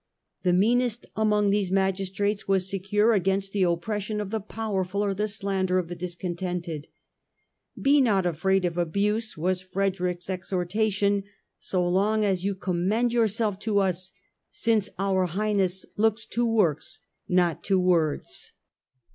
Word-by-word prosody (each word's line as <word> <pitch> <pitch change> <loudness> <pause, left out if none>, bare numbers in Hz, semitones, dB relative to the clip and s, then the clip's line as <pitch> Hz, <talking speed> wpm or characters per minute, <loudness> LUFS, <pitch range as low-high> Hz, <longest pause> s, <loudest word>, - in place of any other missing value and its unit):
The 180 - +2
meanest 235 +5 +2
among 210 -1 +2
these 200 -2 0
magistrates 195 +1 0
was 190 -1 +2
secure 205 +4 +2
against 195 0 +1
the 200 - -1
oppression 205 +4 -1
of 205 -2 -4
the 220 - -1
powerful 200 -2 -2
or 200 - 0
the 210 +2 -1
slander 195 -3 0
of 175 -2 -1
the 175 - -5
discontented. 175 -2 -4 0.5
" - - -22
Be 280 +1 +5
not 200 -7 +2
afraid 185 +3 +1
of 175 0 -1
abuse," 205 +5 0
was 180 +3 0
Frederick's 185 -2 -2
exhortation, 200 +2 0 0.2
" - - -53
so 180 -2 -1
long 210 +4 +2
as 190 -3 0
you 200 0 0
commend 195 +6 0
yourself 220 -3 +1
to 210 -1 0
us; 185 -1 0 0.4
since 220 -3 +1
our 190 -1 +1
Highness 190 0 0
looks 225 +1 +2
to 240 0 0
works, 200 -10 +1 0.3
not 175 -3 +2
to 195 -2 +3
words." 170 -5 0
195 Hz, 145 wpm, -26 LUFS, 180-210 Hz, 0.5 s, Be